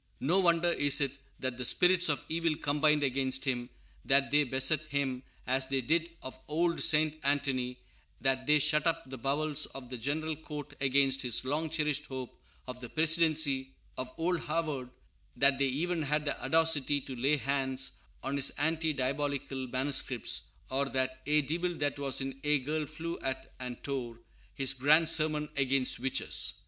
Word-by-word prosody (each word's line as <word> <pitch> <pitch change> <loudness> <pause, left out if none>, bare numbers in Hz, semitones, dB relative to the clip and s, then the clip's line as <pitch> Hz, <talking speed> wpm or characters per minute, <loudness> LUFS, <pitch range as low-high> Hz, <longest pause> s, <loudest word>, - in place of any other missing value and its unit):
No 170 +8 +2
wonder 170 -1 +3
is 145 -4 +2
it 140 -2 +1 0.3
that 130 -1 -3
the - - -2
spirits 180 +6 +4
of 145 - 0
evil 165 -1 0
combined 150 +1 +2
against 130 0 0
him; 125 -2 -2 0.3
that 135 +1 +3
they 150 +1 +4
beset 135 +3 +1
him 135 -3 -2 0.2
as 130 +1 +1
they 135 0 0
did 160 +6 +1
of 130 0 -8
old 170 +2 0
St. 155 0 +3
Anthony; 135 -3 0 0.4
that 130 +1 0
they 150 0 +6
shut 150 +2 +2
up 165 -2 -1
the 130 -1 -8
bowels 150 +3 0
of 130 -2 -9
the 125 - -5
General 155 +6 -2
Court 150 -2 -8
against 135 0 +3
his 125 0 +1
long 155 +4 -1
cherished 150 -2 0
hope 130 -2 -7 0.3
of 125 -1 -7
the 120 - -7
presidency 155 -2 +2 0.2
of 130 0 -5
Old 175 +1 0
Harvard; 150 -6 -3 0.5
that 140 -1 +4
they 140 - +3
even 165 +6 -1
had 150 +1 -1
the 145 - -2
audacity 145 -1 +3
to 130 - -8
lay 140 +5 +2
hands 135 -1 -1 0.2
on 140 - -2
his 140 - +1
anti 160 +1 +1
diabolical 140 -1 -2
manuscripts, 130 -1 -1 0.2
or 135 +1 0
that 130 -1 -1
"ye 150 0 +3
divil 175 +5 -2
that 145 -2 -1
was 135 -1 0
in 135 0 -5
ye 150 0 +3
girl 150 +3 -3
flewe 165 +3 -6
at 130 0 -3
and 125 -1 -7
tore" 125 -5 -4 0.4
his 135 -1 0
grand 150 +5 +4
sermon 155 -2 +2
against 135 -2 +2
witches. 130 +1 0
140 Hz, 170 wpm, -31 LUFS, 130-155 Hz, 0.5 s, they